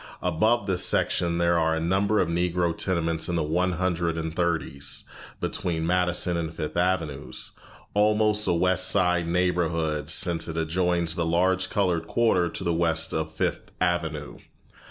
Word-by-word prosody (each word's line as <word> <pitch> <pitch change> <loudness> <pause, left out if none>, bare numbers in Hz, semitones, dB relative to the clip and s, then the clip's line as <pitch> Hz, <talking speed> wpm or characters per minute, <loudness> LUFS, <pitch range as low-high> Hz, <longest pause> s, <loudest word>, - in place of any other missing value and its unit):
Above 105 +6 +2
this 95 -3 +1
section 85 -1 +1
there 85 0 +2
are 80 0 +2
a - - -1
number 95 +5 +1
of 90 - +2
Negro 85 0 0
tenements 85 -3 0
in 85 - -1
the 80 - +1
One 90 +4 0
Hundred 85 -2 -1
and 80 0 -4
Thirties, 85 -5 -1 0.4
between 80 -2 -2
Madison 90 0 0
and 80 -2 -3
Fifth 75 -2 -5
Avenues 85 -5 -2 0.4
almost 105 0 +2
a - - +3
West 90 +2 +2
Side 90 -3 +2
neighborhood, 85 -4 0
since 85 0 +2
it 80 -1 -5
adjoins 85 +1 0
the 85 - -1
large 95 +3 +1
colored 90 -5 0
quarter 95 -7 +2
to - - -7
the 85 - 0
west 80 -1 +1
of - - -2
Fifth - - -3
Avenue. 80 -5 -2
85 Hz, 155 wpm, -26 LUFS, 80-90 Hz, 0.4 s, a